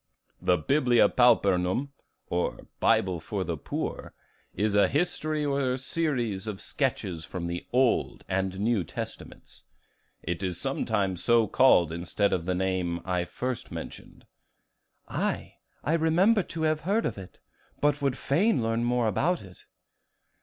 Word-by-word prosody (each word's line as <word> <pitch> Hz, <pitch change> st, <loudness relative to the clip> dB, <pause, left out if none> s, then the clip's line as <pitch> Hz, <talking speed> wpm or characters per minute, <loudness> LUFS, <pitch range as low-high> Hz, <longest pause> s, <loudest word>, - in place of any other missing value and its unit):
"The 90 Hz, -, +3 dB
'Biblia 125 Hz, -, +3 dB
Pauperum,' 110 Hz, 0 st, +3 dB, 0.4 s
or 90 Hz, 0 st, -2 dB
'Bible 90 Hz, -3 st, +2 dB
for 95 Hz, +4 st, -3 dB
the 85 Hz, -2 st, -3 dB
Poor,' 70 Hz, -, -5 dB, 0.4 s
is 105 Hz, 0 st, 0 dB
a 100 Hz, 0 st, +5 dB
history 155 Hz, -1 st, -1 dB
or 140 Hz, -2 st, 0 dB
series 130 Hz, -7 st, -2 dB
of 105 Hz, -3 st, -4 dB
sketches 85 Hz, -4 st, -2 dB
from 85 Hz, +1 st, -5 dB
the 85 Hz, 0 st, -4 dB
Old 125 Hz, -1 st, +1 dB
and 95 Hz, 0 st, -1 dB
New 110 Hz, -2 st, +1 dB
Testaments; -, -, -8 dB, 0.6 s
it 85 Hz, +2 st, -3 dB
is 90 Hz, -3 st, -2 dB
sometimes 100 Hz, -8 st, -1 dB
so 115 Hz, -1 st, +4 dB
called 90 Hz, -9 st, +4 dB
instead 85 Hz, +4 st, 0 dB
of 85 Hz, -1 st, -2 dB
the 90 Hz, -, +1 dB
name 90 Hz, -2 st, -1 dB
I 90 Hz, -2 st, 0 dB
first 125 Hz, +5 st, -4 dB
mentioned." -, -, -9 dB, 0.8 s
"Aye, -, -, -3 dB, 0.3 s
I 155 Hz, -, 0 dB
remember 175 Hz, +7 st, +4 dB
to 165 Hz, -2 st, -5 dB
have 155 Hz, -1 st, +2 dB
heard 205 Hz, +7 st, +1 dB
of -, -, -3 dB
it, 95 Hz, -, -11 dB, 0.4 s
but 145 Hz, 0 st, +1 dB
would 135 Hz, -2 st, 0 dB
fain 165 Hz, -, +2 dB
learn 115 Hz, +1 st, 0 dB
more 120 Hz, 0 st, +1 dB
about 160 Hz, -, 0 dB
it." 90 Hz, -3 st, -15 dB
110 Hz, 140 wpm, -27 LUFS, 90-140 Hz, 0.8 s, a